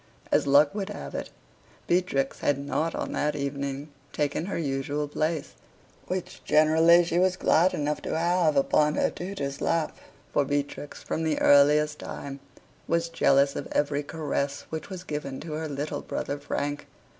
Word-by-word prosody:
As -, -, +3 dB
luck 145 Hz, +1 st, +5 dB
would 200 Hz, -1 st, -3 dB
have 205 Hz, -, -7 dB
it, -, -, -4 dB, 0.6 s
Beatrix 170 Hz, -7 st, 0 dB
had 145 Hz, -, +1 dB
not 150 Hz, +3 st, -2 dB
on -, -, -3 dB
that 150 Hz, +1 st, 0 dB
evening 140 Hz, +1 st, -3 dB, 0.2 s
taken 150 Hz, +3 st, -1 dB
her 200 Hz, -, -2 dB
usual 145 Hz, -1 st, -2 dB
place, 155 Hz, +1 st, -2 dB, 0.5 s
which 185 Hz, -1 st, -4 dB
generally 160 Hz, +3 st, +5 dB
she 170 Hz, 0 st, 0 dB
was 185 Hz, 0 st, +3 dB
glad 180 Hz, +1 st, +3 dB
enough 150 Hz, 0 st, -1 dB
to -, -, -2 dB
have, 170 Hz, -2 st, +2 dB
upon 150 Hz, +2 st, +3 dB
her -, -, +1 dB
tutor's 145 Hz, -7 st, -5 dB
lap. 165 Hz, -2 st, 0 dB, 0.4 s
For 145 Hz, -, +3 dB
Beatrix, 145 Hz, +1 st, -3 dB
from 165 Hz, -, -2 dB
the 160 Hz, -2 st, 0 dB
earliest 150 Hz, +1 st, +5 dB
time, 140 Hz, 0 st, -7 dB, 0.5 s
was 170 Hz, 0 st, +1 dB
jealous 140 Hz, -4 st, +3 dB
of -, -, -4 dB
every 145 Hz, 0 st, +1 dB
caress 145 Hz, -2 st, -2 dB
which 160 Hz, +2 st, -5 dB
was 185 Hz, -2 st, -7 dB
given 150 Hz, -5 st, -5 dB
to 155 Hz, -1 st, -6 dB
her 160 Hz, +1 st, -3 dB
little 145 Hz, +1 st, -3 dB
brother 145 Hz, -, -4 dB
Frank. 145 Hz, 0 st, -3 dB
150 Hz, 160 wpm, -27 LUFS, 140-165 Hz, 0.6 s, luck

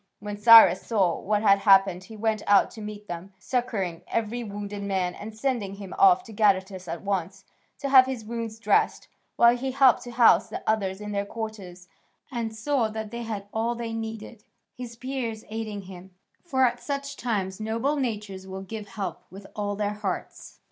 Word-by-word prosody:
When 205 Hz, 0 st, -6 dB
Cyrus 225 Hz, +2 st, +8 dB
saw 195 Hz, -7 st, +1 dB
what 210 Hz, +2 st, 0 dB
had 200 Hz, -2 st, +5 dB
happened 195 Hz, -2 st, +4 dB
he 220 Hz, +1 st, -11 dB
went 220 Hz, 0 st, 0 dB
out 200 Hz, -1 st, +5 dB
to 220 Hz, -, -10 dB
meet 210 Hz, 0 st, -8 dB
them, 175 Hz, +2 st, -7 dB
succouring 200 Hz, -8 st, -2 dB
every 230 Hz, +2 st, -2 dB
wounded 205 Hz, -1 st, -6 dB
man 190 Hz, -3 st, -1 dB
and 215 Hz, +3 st, -9 dB
sending 220 Hz, -6 st, -2 dB
him 195 Hz, -2 st, -9 dB
off 375 Hz, -2 st, +6 dB
to 225 Hz, -, -12 dB
Gadatas 190 Hz, -3 st, +1 dB
at 165 Hz, +2 st, -5 dB
once, 195 Hz, -3 st, -3 dB, 0.3 s
to 280 Hz, -, -4 dB
have 260 Hz, -1 st, +7 dB
his 250 Hz, -5 st, -5 dB
wounds 230 Hz, -1 st, -5 dB
dressed, 215 Hz, -2 st, +1 dB, 0.3 s
while 235 Hz, 0 st, +6 dB
he 260 Hz, +2 st, -3 dB
helped 260 Hz, -1 st, +4 dB
to -, -, -7 dB
house 235 Hz, -1 st, +5 dB
the -, -, -6 dB
others 200 Hz, -3 st, -1 dB
in 210 Hz, 0 st, -6 dB
their 200 Hz, 0 st, -1 dB
quarters, 200 Hz, -6 st, -7 dB, 0.4 s
and 230 Hz, -3 st, -3 dB
saw 245 Hz, +1 st, 0 dB
that 220 Hz, -1 st, -6 dB
they 235 Hz, 0 st, -5 dB
had 215 Hz, -3 st, -5 dB
all 230 Hz, +2 st, 0 dB
they 230 Hz, -1 st, -5 dB
needed, 225 Hz, -1 st, -6 dB, 0.3 s
his 245 Hz, -2 st, -8 dB
Peers 240 Hz, -3 st, -4 dB
aiding 215 Hz, -2 st, -5 dB
him, 185 Hz, 0 st, -11 dB, 0.3 s
for 265 Hz, -6 st, +2 dB
at 240 Hz, 0 st, 0 dB
such 280 Hz, 0 st, -4 dB
times 200 Hz, -7 st, -2 dB
noble 230 Hz, +7 st, -1 dB
natures 210 Hz, -8 st, -4 dB
will 190 Hz, 0 st, -7 dB
give 210 Hz, +1 st, -7 dB
help 200 Hz, -1 st, -5 dB
with 195 Hz, +2 st, -12 dB
all 205 Hz, -1 st, -2 dB
their 205 Hz, 0 st, -1 dB
hearts. 205 Hz, -3 st, -5 dB
215 Hz, 185 wpm, -26 LUFS, 200-235 Hz, 0.4 s, Cyrus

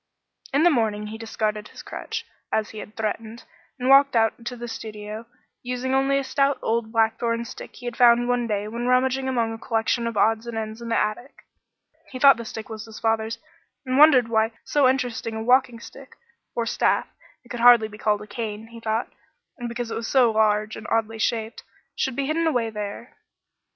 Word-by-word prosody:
In 285 Hz, +3 st, +3 dB
the 350 Hz, -, +6 dB
morning 215 Hz, -5 st, 0 dB
he 220 Hz, -, -8 dB
discarded 215 Hz, -2 st, -3 dB
his -, -, -12 dB
crutch, 445 Hz, +1 st, -6 dB, 0.3 s
as 220 Hz, 0 st, 0 dB
he 215 Hz, -, -8 dB
had 210 Hz, -, -10 dB
threatened, 220 Hz, +1 st, -4 dB, 0.3 s
and 250 Hz, -1 st, -3 dB
walked 275 Hz, 0 st, +6 dB
out 225 Hz, +1 st, +2 dB
to 250 Hz, -, -4 dB
the 240 Hz, 0 st, -7 dB
studio, 215 Hz, 0 st, -7 dB, 0.3 s
using 250 Hz, +1 st, -3 dB
only 270 Hz, +1 st, +2 dB
a 275 Hz, -, 0 dB
stout 275 Hz, +1 st, +1 dB
old 225 Hz, 0 st, -1 dB
blackthorn 230 Hz, +1 st, +1 dB
stick -, -, -10 dB
he 245 Hz, -, -12 dB
had 240 Hz, -1 st, -4 dB
found 240 Hz, 0 st, +5 dB
one 245 Hz, -1 st, +1 dB
day 210 Hz, -1 st, -2 dB
when 235 Hz, +3 st, -4 dB
rummaging 260 Hz, +1 st, +2 dB
among 230 Hz, -3 st, 0 dB
a 225 Hz, -, -8 dB
collection 230 Hz, +1 st, 0 dB
of 230 Hz, -2 st, -4 dB
odds 225 Hz, +2 st, +2 dB
and 235 Hz, -1 st, -5 dB
ends 220 Hz, +1 st, -5 dB
in 235 Hz, -, -6 dB
the 230 Hz, -, +1 dB
attic. 215 Hz, +6 st, -3 dB, 0.6 s
He 260 Hz, -, -7 dB
thought 275 Hz, 0 st, +7 dB
the 235 Hz, -, -7 dB
stick 220 Hz, 0 st, -7 dB
was 220 Hz, -1 st, -7 dB
his 225 Hz, -1 st, -11 dB
father's 225 Hz, 0 st, 0 dB, 0.5 s
and 260 Hz, +1 st, +1 dB
wondered 275 Hz, -6 st, +7 dB
why 225 Hz, 0 st, +1 dB
so 285 Hz, -3 st, +3 dB
interesting 245 Hz, -3 st, -2 dB
a 220 Hz, -, -3 dB
walking 250 Hz, -1 st, +3 dB
stick -, -, -13 dB, 0.4 s
or 235 Hz, -, 0 dB
staff; -, -, +1 dB, 0.4 s
it 240 Hz, -, -21 dB
could 240 Hz, -, -5 dB
hardly 235 Hz, -2 st, +7 dB
be 210 Hz, 0 st, -13 dB
called 210 Hz, -1 st, +1 dB
a -, -, -12 dB
cane, 220 Hz, 0 st, -5 dB
he 230 Hz, 0 st, -11 dB
thought, 225 Hz, +1 st, -2 dB, 0.6 s
because 235 Hz, -1 st, -4 dB
it -, -, -3 dB
was 225 Hz, 0 st, -4 dB
so 250 Hz, -4 st, +4 dB
large 215 Hz, 0 st, +1 dB
and 220 Hz, -, -9 dB
oddly 225 Hz, 0 st, 0 dB
shaped 225 Hz, 0 st, -1 dB, 0.3 s
should 265 Hz, -3 st, -1 dB
be 275 Hz, -, -1 dB
hidden 325 Hz, +3 st, 0 dB
away 240 Hz, -7 st, 0 dB
there. 210 Hz, +2 st, -7 dB
230 Hz, 200 wpm, -24 LUFS, 220-250 Hz, 0.6 s, thought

